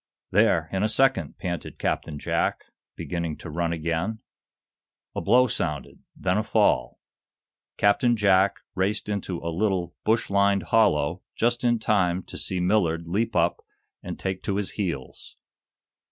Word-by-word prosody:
"There, - - +3
in 95 - -1
a 105 - +2
second!" 135 +4 +2
panted 85 -2 -5
Captain 75 - -2
Jack, - - -1 0.3
beginning 85 -3 -4
to 80 - -8
run 85 +1 -1
again. 85 +6 -2 1.0
A - - -2
blow 125 +5 +5
sounded, 75 - -3 0.2
then 95 +2 0
a - - 0
fall. - - +1 0.8
Captain 115 +4 +3
Jack 100 -1 +3
raced 100 +3 -1
into 100 -3 -3
a 85 0 -3
little, 90 -2 0
bush 110 -1 +1
lined 100 0 +3
hollow, 90 -7 +2
just 120 +1 +1
in 120 -1 +3
time 95 -5 +1
to - - -10
see 95 - -2
Millard 90 -3 +1
leap 105 +7 -1
up - - +1 0.4
and - - -6
take 95 -1 -3
to 100 - -2
his 100 -1 -1
heels. 85 -11 -5
95 Hz, 145 wpm, -25 LUFS, 85-105 Hz, 1.0 s, blow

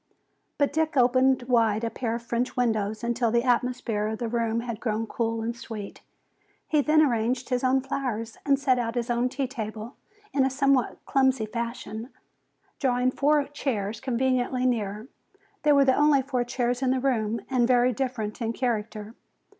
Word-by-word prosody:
But 285 -1 +1
Dick 315 -1 0
opened 255 +1 +4
wide 230 -3 +2
a 230 - -1
pair 230 -2 -2
of 235 - -6
French 240 +2 -2
windows 220 -2 0
until 235 0 +1
the 235 +1 +2
atmosphere 245 -4 0
of 220 0 -3
the 235 - -3
room 230 0 0
had 235 -2 -5
grown 225 -1 -1
cool 225 0 -2
and 230 +1 -3
sweet. 220 -3 -8 0.7
He 305 -2 +3
then 310 +2 +4
arranged 245 -1 0
his 250 -1 0
own 260 +1 +3
flowers 245 -4 -3
and 280 -1 +3
set 260 -3 +2
out 230 0 -2
his 240 0 -1
own 240 +1 +1
tea 275 +1 -2
table 220 -2 -6 0.4
in 275 - +3
a 265 - +2
somewhat 270 -1 +1
clumsy 265 -4 +2
fashion, 230 0 -5 0.7
drawing 250 -1 +2
four 290 +2 +2
chairs 225 -7 -3
conveniently 255 0 0
near. 215 -2 -1 0.5
They 300 - +3
were 280 -1 +5
the 260 - +4
only 290 -1 +4
four 255 -2 -1
chairs 245 0 -1
in 260 - +1
the 260 0 +2
room 230 -4 0
and 250 -3 +2
very 250 0 +3
different 245 -4 -3
in 230 0 -1
character. 220 -3 -3
245 Hz, 175 wpm, -26 LUFS, 225-265 Hz, 0.7 s, were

